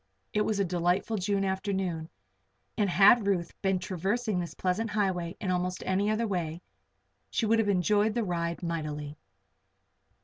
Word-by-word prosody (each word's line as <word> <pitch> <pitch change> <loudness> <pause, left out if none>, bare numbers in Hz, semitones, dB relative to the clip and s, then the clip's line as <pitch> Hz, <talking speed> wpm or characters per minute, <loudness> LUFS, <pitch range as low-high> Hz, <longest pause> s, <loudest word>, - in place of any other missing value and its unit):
It 210 - +2
was 210 -1 0
a 200 - +2
delightful 180 +5 0
June 195 0 0
afternoon 190 -4 -2 0.7
and 205 -3 +1
had 200 +5 +6
Ruth 175 -4 0
been 190 -1 +2
traversing 195 +3 -1
this 170 -1 -5
pleasant 195 +5 -1
highway 190 -4 -1
in 190 - -1
almost 180 0 -1
any 195 +2 +1
other 215 +2 +1
way, 175 -4 -3 0.7
she 230 - 0
would 225 +1 +3
have 215 -2 +2
enjoyed 205 +3 +2
the 235 - +1
ride 170 -2 -2
mightily. 150 -3 -4
190 Hz, 150 wpm, -29 LUFS, 175-210 Hz, 0.7 s, had